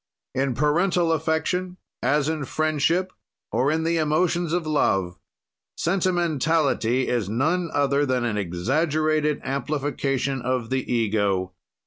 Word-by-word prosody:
"In 130 Hz, -1 st, 0 dB
parental 170 Hz, +4 st, +2 dB
affection, 160 Hz, +3 st, -1 dB, 0.2 s
as 140 Hz, +3 st, +2 dB
in 155 Hz, -3 st, -2 dB
friendship 155 Hz, +5 st, 0 dB, 0.4 s
or 130 Hz, +3 st, +2 dB
in 160 Hz, +1 st, 0 dB
the 165 Hz, +1 st, +1 dB
emotions 165 Hz, +2 st, +1 dB
of 175 Hz, -1 st, 0 dB
love, 95 Hz, -12 st, 0 dB, 0.6 s
sentimentality 160 Hz, -, +1 dB
is 115 Hz, -6 st, -1 dB
none 160 Hz, -, 0 dB
other 140 Hz, 0 st, +2 dB
than 130 Hz, -3 st, 0 dB
an 115 Hz, -3 st, -1 dB
exaggerated 150 Hz, -, 0 dB
amplification 135 Hz, -1 st, -2 dB
of 125 Hz, -1 st, -2 dB
the 130 Hz, -1 st, -1 dB
ego. 100 Hz, -5 st, 0 dB
145 Hz, 115 wpm, -24 LUFS, 125-160 Hz, 0.6 s, parental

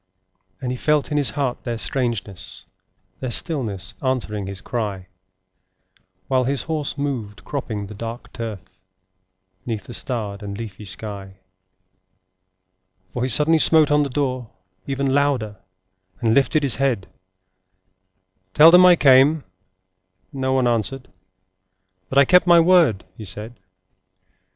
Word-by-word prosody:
And 125 Hz, -2 st, -3 dB
he 125 Hz, -, -4 dB
felt 150 Hz, +1 st, +1 dB
in 150 Hz, -, 0 dB
his 145 Hz, -4 st, +3 dB
heart 135 Hz, -4 st, -3 dB
their 120 Hz, -2 st, -3 dB
strangeness, 115 Hz, -7 st, -3 dB, 0.5 s
Their 130 Hz, -, -4 dB
stillness 120 Hz, -, -2 dB
answering 110 Hz, -7 st, -2 dB
his 100 Hz, 0 st, -5 dB
cry, 100 Hz, -4 st, -4 dB, 1.2 s
While 130 Hz, -1 st, +1 dB
his 135 Hz, +1 st, -1 dB
horse 155 Hz, -3 st, -3 dB
moved, 125 Hz, -8 st, -4 dB
cropping 110 Hz, -8 st, -4 dB
the 105 Hz, -, -10 dB
dark 115 Hz, +3 st, -8 dB
turf, 110 Hz, -5 st, -6 dB, 1.0 s
'Neath 110 Hz, -5 st, -4 dB
the 120 Hz, -, -10 dB
starred 110 Hz, -6 st, -4 dB
and 100 Hz, -1 st, -6 dB
leafy 105 Hz, -2 st, -8 dB
sky; 95 Hz, 0 st, -7 dB, 1.8 s
For 120 Hz, -, -3 dB
he 130 Hz, -, 0 dB
suddenly 155 Hz, +6 st, +3 dB
smote 155 Hz, -2 st, +5 dB
on 150 Hz, 0 st, +4 dB
the 145 Hz, -, -1 dB
door, 130 Hz, -3 st, -2 dB, 0.4 s
even 135 Hz, -1 st, -1 dB
Louder, 135 Hz, -8 st, 0 dB, 0.6 s
and 115 Hz, -3 st, +1 dB
lifted 140 Hz, +4 st, +2 dB
his 135 Hz, -, -2 dB
head:— 130 Hz, -8 st, 0 dB, 1.5 s
'Tell 160 Hz, +3 st, +8 dB
them 180 Hz, +1 st, +8 dB
I 180 Hz, -, +7 dB
came, 140 Hz, +1 st, +5 dB, 0.9 s
and 135 Hz, -2 st, -7 dB
no 130 Hz, 0 st, +1 dB
one 130 Hz, -2 st, +2 dB
answered, 120 Hz, +3 st, -1 dB, 1.0 s
That 135 Hz, -, -2 dB
I 140 Hz, -, +7 dB
kept 180 Hz, +2 st, +4 dB
my 175 Hz, -1 st, +7 dB
word,' 165 Hz, -, +4 dB
he 110 Hz, -, -9 dB
said. 105 Hz, +4 st, -7 dB
125 Hz, 135 wpm, -21 LUFS, 110-140 Hz, 1.8 s, Tell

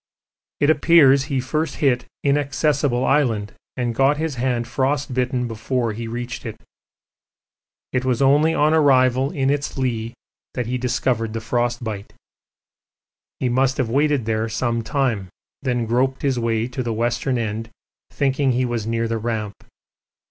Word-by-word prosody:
It 145 Hz, +2 st, +4 dB
appears 145 Hz, -4 st, +5 dB
he 140 Hz, -2 st, -1 dB
first 150 Hz, +5 st, -2 dB
hit 125 Hz, -5 st, +1 dB, 0.2 s
Inaccessible 140 Hz, -2 st, +1 dB
Island, 115 Hz, -8 st, +1 dB, 0.2 s
and 120 Hz, -2 st, -1 dB
got 135 Hz, +4 st, +3 dB
his 160 Hz, -1 st, -2 dB
hand 120 Hz, -1 st, -1 dB
frostbitten 130 Hz, -1 st, -1 dB
before 115 Hz, +1 st, -2 dB
he 115 Hz, +2 st, -5 dB
reached 120 Hz, +1 st, -5 dB
it. -, -, -7 dB, 1.3 s
It 125 Hz, -1 st, +1 dB
was 125 Hz, -2 st, 0 dB
only 145 Hz, +4 st, +4 dB
on 150 Hz, +1 st, +3 dB
arrival 130 Hz, -3 st, +4 dB
in 135 Hz, -1 st, 0 dB
its 145 Hz, -1 st, -2 dB
lee 120 Hz, -3 st, -2 dB, 0.4 s
that 125 Hz, -, -1 dB
he 125 Hz, +2 st, -2 dB
discovered 120 Hz, -3 st, -1 dB
the 115 Hz, -, -2 dB
frostbite. 120 Hz, -2 st, -2 dB, 1.3 s
He 130 Hz, -, 0 dB
must 130 Hz, +2 st, +1 dB
have 120 Hz, -4 st, -1 dB
waited 145 Hz, -2 st, +2 dB
there 110 Hz, 0 st, -1 dB
some 115 Hz, +1 st, -1 dB
time, 115 Hz, -6 st, -1 dB, 0.3 s
then 125 Hz, -3 st, -1 dB
groped 130 Hz, +3 st, 0 dB
his 135 Hz, -3 st, +1 dB
way 115 Hz, -1 st, 0 dB
to 130 Hz, +1 st, -4 dB
the 120 Hz, -2 st, -2 dB
western 120 Hz, +3 st, 0 dB
end 110 Hz, 0 st, -3 dB, 0.4 s
thinking 135 Hz, -1 st, +1 dB
he 125 Hz, +1 st, +1 dB
was 120 Hz, -3 st, -3 dB
near 115 Hz, 0 st, 0 dB
the 115 Hz, 0 st, -2 dB
Ramp. 110 Hz, -2 st, -3 dB
125 Hz, 150 wpm, -21 LUFS, 115-135 Hz, 1.3 s, appears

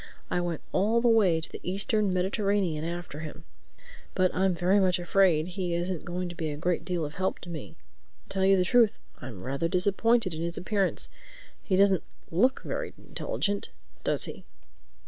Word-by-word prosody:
I 175 Hz, -, +1 dB
went 175 Hz, -3 st, -3 dB
all 215 Hz, +5 st, +3 dB
the 240 Hz, -, +2 dB
way 205 Hz, -8 st, +4 dB
to 160 Hz, -, -6 dB
the -, -, -7 dB
Eastern 200 Hz, +2 st, 0 dB
Mediterranean 190 Hz, -3 st, 0 dB
after 170 Hz, -3 st, -5 dB
him. 155 Hz, 0 st, -8 dB, 0.7 s
But 185 Hz, -1 st, +2 dB
I'm 190 Hz, -1 st, +2 dB
very 180 Hz, +4 st, +3 dB
much 185 Hz, -2 st, +3 dB
afraid 175 Hz, -2 st, +3 dB
he 180 Hz, -2 st, -2 dB
isn't 175 Hz, 0 st, -2 dB
going 180 Hz, +1 st, -3 dB
to 175 Hz, -, -6 dB
be 160 Hz, -2 st, -2 dB
a 145 Hz, -, -4 dB
great 175 Hz, +2 st, 0 dB
deal 175 Hz, -2 st, -1 dB
of 150 Hz, -, -7 dB
help 190 Hz, +3 st, -1 dB
to 175 Hz, -, -9 dB
me. 155 Hz, -4 st, -7 dB, 0.5 s
To -, -, -29 dB
tell 190 Hz, -1 st, 0 dB
you 195 Hz, 0 st, +6 dB
the 180 Hz, -, +2 dB
truth, 230 Hz, +1 st, +4 dB, 0.2 s
I'm 115 Hz, -8 st, -8 dB
rather 140 Hz, +5 st, -1 dB
disappointed 200 Hz, +3 st, +2 dB
in 160 Hz, -, -5 dB
his 170 Hz, 0 st, -1 dB
appearance. 195 Hz, 0 st, 0 dB, 0.5 s
He 190 Hz, -, 0 dB
doesn't 195 Hz, -1 st, +4 dB, 0.3 s
look 245 Hz, +11 st, +2 dB
very -, -, -4 dB
intelligent, 205 Hz, -, -3 dB, 0.3 s
does -, -, +1 dB
he?" -, -, -6 dB
180 Hz, 185 wpm, -28 LUFS, 170-200 Hz, 0.7 s, you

